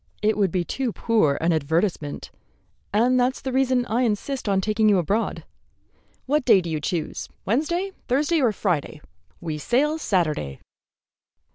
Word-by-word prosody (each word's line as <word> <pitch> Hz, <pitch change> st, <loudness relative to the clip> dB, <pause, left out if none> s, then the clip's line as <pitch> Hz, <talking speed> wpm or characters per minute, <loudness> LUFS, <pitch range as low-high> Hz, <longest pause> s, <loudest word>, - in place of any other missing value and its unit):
"It 215 Hz, 0 st, +3 dB
would 195 Hz, -4 st, +1 dB
be 180 Hz, 0 st, 0 dB
too 255 Hz, +7 st, -2 dB
poor 210 Hz, -12 st, +1 dB
an 165 Hz, +1 st, +2 dB
advertisement, 160 Hz, 0 st, -1 dB, 0.6 s
and 245 Hz, +5 st, +3 dB
that's 250 Hz, +1 st, +1 dB
the 265 Hz, -, -4 dB
reason 255 Hz, -1 st, +2 dB
I 235 Hz, +2 st, 0 dB
insist 240 Hz, +1 st, -1 dB
on 195 Hz, -1 st, +2 dB
taking 215 Hz, +2 st, +2 dB
you 200 Hz, -, +4 dB
abroad. 195 Hz, +6 st, -1 dB, 0.8 s
What 295 Hz, +2 st, +1 dB
day 200 Hz, -, +6 dB
do 170 Hz, -2 st, -4 dB
you 155 Hz, -, -1 dB
choose, 170 Hz, 0 st, -3 dB, 0.2 s
Wednesday, 340 Hz, -, 0 dB, 0.2 s
Thursday, 300 Hz, +5 st, +2 dB
or 245 Hz, -4 st, +3 dB
Friday? 170 Hz, -7 st, -2 dB, 0.4 s
We 160 Hz, -3 st, -4 dB
sail 290 Hz, -, +1 dB
Saturday." 155 Hz, -, -1 dB
215 Hz, 150 wpm, -24 LUFS, 170-255 Hz, 0.8 s, day